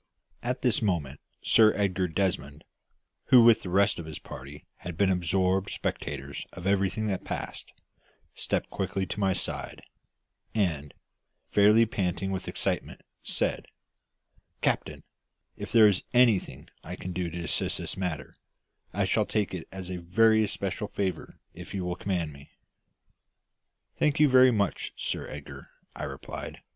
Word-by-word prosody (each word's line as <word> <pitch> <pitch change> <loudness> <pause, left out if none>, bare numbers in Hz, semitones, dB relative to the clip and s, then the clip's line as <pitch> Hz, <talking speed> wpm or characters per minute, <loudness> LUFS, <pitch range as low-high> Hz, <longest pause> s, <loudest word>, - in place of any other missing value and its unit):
At 125 +1 -3
this 125 -5 +3
moment 80 -10 -1 0.2
Sir 110 -1 +5
Edgar 95 -3 +1
Desmond, 80 -5 -2 0.6
who 125 -2 +7
with 115 -1 +6
the 90 - -6
rest 100 +2 +3
of 80 - -7
his 80 - -6
party 70 +3 -10
had 85 -2 -7
been 100 0 +3
absorbed 95 +2 +1
spectators 70 0 -4
of 90 - -9
everything 100 +2 +1
that 95 -3 -2
passed, - - -6 0.6
stepped - - -2
quickly 95 -1 -2
to 100 - -5
my 95 -2 +2
side, - - -4 0.7
and, 80 -9 -1 0.6
fairly 105 +3 +6
panting 95 -3 -2
with 95 -1 -4
excitement, - - -2 0.2
said - - -2 1.0
"Captain, - - 0 0.5
if - - -7
there 115 -2 +8
is 100 -3 +2
anything 120 -6 +3 0.2
I - - -6
can 90 - -6
do 90 -1 -2
to 85 +1 -5
assist - - 0
in - - -5
this - - -3
matter, 90 -6 -4 0.6
I 100 0 +2
shall 105 +2 +1
take 105 -4 -1
it 90 -3 -5
as 95 -1 -7
a 90 - -3
very 110 +6 +4
especial 100 0 -3
favour 95 -2 -3 0.2
if - - -9
you 95 -2 -2
will 90 0 -2
command 90 -6 -2
me." 70 0 -14 1.5
"Thank 150 -1 +2
you 150 - +7
very 130 -1 +7
much, 100 -5 -1
Sir - - -3
Edgar," 75 -1 -9 0.3
I - - -4
replied. - - -7
95 Hz, 150 wpm, -28 LUFS, 85-105 Hz, 1.5 s, there